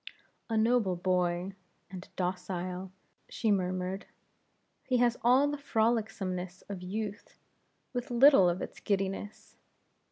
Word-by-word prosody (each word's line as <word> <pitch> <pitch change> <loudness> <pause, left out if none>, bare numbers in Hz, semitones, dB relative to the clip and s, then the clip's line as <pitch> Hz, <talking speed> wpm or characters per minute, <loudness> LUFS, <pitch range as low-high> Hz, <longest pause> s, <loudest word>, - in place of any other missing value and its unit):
"A 225 - 0
noble 220 -4 +3
boy, 180 +1 0 0.4
and 185 -1 -9
docile" 180 0 -3 0.4
she 225 -3 0
murmured 185 0 -1 0.8
"he 255 - +1
has 240 -1 +3
all 255 +4 +5
the 290 0 -3
frolicsomeness 210 -7 -1
of 195 -3 -6
youth, 205 +3 -5 0.6
with 245 0 -3
little 240 -6 +7
of 175 +2 -2
its - - -8
giddiness. 195 +1 -3
195 Hz, 115 wpm, -30 LUFS, 180-230 Hz, 0.8 s, little